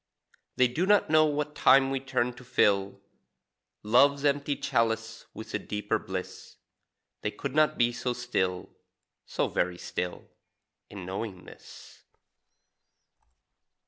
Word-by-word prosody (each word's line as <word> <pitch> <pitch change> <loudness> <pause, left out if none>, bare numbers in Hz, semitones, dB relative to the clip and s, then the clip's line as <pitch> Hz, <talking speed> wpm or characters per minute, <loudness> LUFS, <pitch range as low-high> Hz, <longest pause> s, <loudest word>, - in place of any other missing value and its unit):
They 130 - +4
do 160 +10 -1
not 205 -5 +3
know 155 0 +6
what 150 0 -2
time 135 -1 +5
we 135 - -1
turn 130 -2 -1
to 125 - -14
fill 100 -4 +1 0.8
Love's 140 +6 +4
empty 145 0 +1
chalice 115 -2 -1
with 110 - -9
a - - 0
cheaper 105 -1 -2
bliss; 95 -1 -7 0.7
They - - -1
could - - -6
not 155 0 +3
be 120 0 +2
so 125 +1 -2
still 95 -7 -2 0.6
so - - -1
very 90 0 -1
still 90 0 -5 0.6
In 95 -3 -8
knowing 95 0 -6
this. - - -14
120 Hz, 125 wpm, -28 LUFS, 100-140 Hz, 0.8 s, know